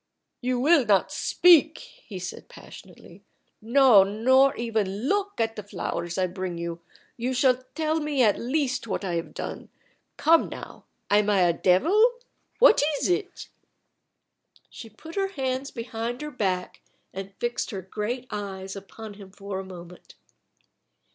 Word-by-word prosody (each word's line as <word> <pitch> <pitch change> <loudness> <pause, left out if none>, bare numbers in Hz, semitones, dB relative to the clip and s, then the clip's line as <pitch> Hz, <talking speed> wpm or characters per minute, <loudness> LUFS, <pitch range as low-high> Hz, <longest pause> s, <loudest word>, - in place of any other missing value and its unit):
"You 250 0 -1
will 295 +2 +4
not 205 -4 +2
speak," 330 -3 +4
he 235 - -11
said 180 -1 -8
passionately. - - -14 0.4
"No; 240 -2 +6
nor 260 +7 +3
even 220 -1 -2
look 405 0 -1
at 225 0 0
the 210 - -5
flowers 175 -3 -5
I 185 - +2
bring 185 -1 -5
you. 170 0 -5 0.4
You 250 +2 -2
shall 255 0 +2
tell 315 0 0
me 295 -4 +1
at 210 -3 +3
least 255 -1 -1
what 200 -1 -3
I 180 - -2
have 165 -1 -4
done. - - -6 0.5
Come, 325 +2 +4
now. - - -10 0.3
Am 210 0 +4
I 200 -2 +3
a 175 -1 +4
devil? 340 - +3 0.4
What 475 - +6 0.2
is - - -1
it?" 375 +1 -3 1.2
She 225 - -10
put 320 +10 -12
her 390 +1 0
hands 265 -1 -2
behind 235 +2 -5
her 300 - -6
back 185 -7 -2 0.3
and 195 +1 -7
fixed 240 0 -2
her 195 -5 -6
great 215 +6 -4
eyes 195 -2 -6
upon 205 +2 -10
him 200 -1 -13
for 200 0 -6
a - - -5
moment. 180 -2 -12
225 Hz, 150 wpm, -25 LUFS, 195-275 Hz, 1.2 s, No